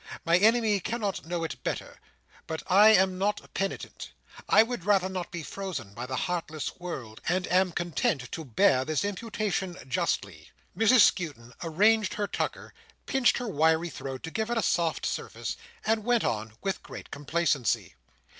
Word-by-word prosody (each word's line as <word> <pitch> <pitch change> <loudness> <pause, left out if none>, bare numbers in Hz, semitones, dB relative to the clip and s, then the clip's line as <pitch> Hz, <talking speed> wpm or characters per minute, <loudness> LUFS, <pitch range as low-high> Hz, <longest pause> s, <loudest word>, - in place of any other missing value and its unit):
My 170 +1 +4
enemy 220 -1 +4
cannot 205 -4 -3
know 170 -1 -2
it 165 - -5
better. - - -4 0.5
But 160 0 -4
I 205 +4 +7
am 190 -3 +4
not 205 +2 -1
penitent; 195 0 -4 0.4
I - - +7
would 235 -5 -5
rather 195 -1 +3
not 185 -2 -4
be 170 -3 -6
frozen 165 - -6
by 120 +4 -6
the 130 - -3
heartless 160 -5 -3
world, 130 -11 -7
and 180 +1 +1
am 185 0 +3
content 155 -6 -1
to 160 - -5
bear 130 - +3
this 155 +5 -1
imputation 205 -3 -2
justly." 130 - -2 0.3
Mrs 225 +2 +6
Skewton 140 - +1
arranged 205 +6 +3
her 205 - -1
tucker, - - -4 0.3
pinched 265 -2 +3
her 245 - -3
wiry 160 -1 +2
throat 135 -1 -6
to 165 - -5
give 220 +3 -2
it 240 - 0
a 225 - +1
soft 170 -2 +1
surface, - - -3 0.3
and 220 -1 +1
went 240 0 +2
on, 110 0 -2
with 195 -1 -2
great - - -10
complacency. 145 -3 0
180 Hz, 165 wpm, -28 LUFS, 155-210 Hz, 0.5 s, I